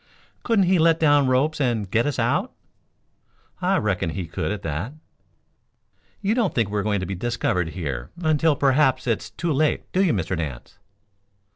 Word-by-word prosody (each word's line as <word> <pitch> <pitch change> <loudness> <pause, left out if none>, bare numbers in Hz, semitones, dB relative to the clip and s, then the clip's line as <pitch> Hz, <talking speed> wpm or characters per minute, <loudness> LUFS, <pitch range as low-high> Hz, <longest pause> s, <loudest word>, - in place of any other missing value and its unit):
"Couldn't 220 -5 +2
he 180 0 +3
let 165 0 +4
down 145 -3 +4
ropes 140 +4 +1
and 115 -7 -1
get 115 +4 +2
us 145 - -2
out?" - - 0 1.1
"I - - +2
reckon 95 -4 0
he 90 +2 -4
could 85 - -3
at 105 -2 -5
that." 80 - -3 1.3
"You 200 +2 +2
don't 230 -6 0
think 110 -4 +1
we 105 - 0
are - - -1
going 105 -2 0
to - - -3
be 95 - -4
discovered 95 -4 -1
here 70 -9 -5
until 155 -2 +2
perhaps 135 0 +2
it 115 -3 0
is 110 - -9
too 160 +8 -2
late, 150 +2 +1
do 190 - +2
you, 180 - +3
Mr. 95 -2 -1
Nance?" 75 -8 -6
120 Hz, 180 wpm, -23 LUFS, 95-155 Hz, 1.3 s, let